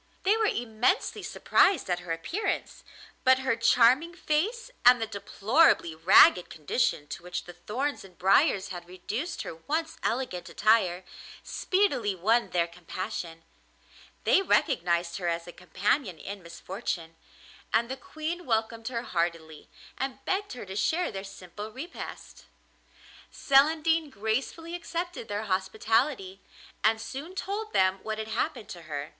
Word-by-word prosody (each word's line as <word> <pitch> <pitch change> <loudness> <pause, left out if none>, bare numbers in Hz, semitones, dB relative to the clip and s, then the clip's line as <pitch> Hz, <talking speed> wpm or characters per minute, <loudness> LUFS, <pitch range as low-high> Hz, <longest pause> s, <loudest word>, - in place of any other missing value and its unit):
They 400 +3 +4
were 445 -1 +2
immensely 235 - 0
surprised 385 -7 +2
at 180 -1 0
her 180 -1 -7
appearance, 245 - -3 0.4
but 260 0 +6
her 260 - +2
charming 250 +8 +4
face, 435 +11 -1
and 245 0 +8
the 225 - -1
deplorably 215 - +2
ragged 175 +2 +6
condition 150 - -1
to - - -6
which 175 0 -5
the 175 - -11
thorns 250 +11 -3
and 185 -3 -16
briers 195 - +3
had 175 -2 -7
reduced 215 - -4
her - - -6
once 315 - -3
elegant 230 -7 -2
attire, 190 -5 +2 0.4
speedily 275 - 0
won 220 +7 +2
their 170 -1 +1
compassion; 170 -1 -6 0.8
they - - +4
recognised 175 - +1
her 180 -3 -3
as 170 0 -1
a 175 - -9
companion 185 - -1
in 200 +4 -7
misfortune, 170 -1 -5 0.6
and 230 +2 +2
the 265 - -4
Queen 315 +6 -6
welcomed 225 0 -1
her 235 -2 -3
heartily, 165 -4 -3 0.3
and 265 0 -4
begged 400 -2 -1
her 245 - -7
to 190 0 -8
share 320 - +1
their 195 -2 -6
simple 195 +2 -9
repast. 285 +10 -9 0.9
Celandine 315 +3 +3
gracefully 260 +9 -3
accepted 345 -5 -4
their 205 +1 -3
hospitality, 200 +2 0 0.4
and 220 +1 +3
soon 275 +10 -7
told 420 +3 -4
them 190 - +3
what 220 0 -4
had 220 0 -5
happened 220 - -2
to 175 - -8
her. 145 0 -4
220 Hz, 140 wpm, -28 LUFS, 180-285 Hz, 0.9 s, and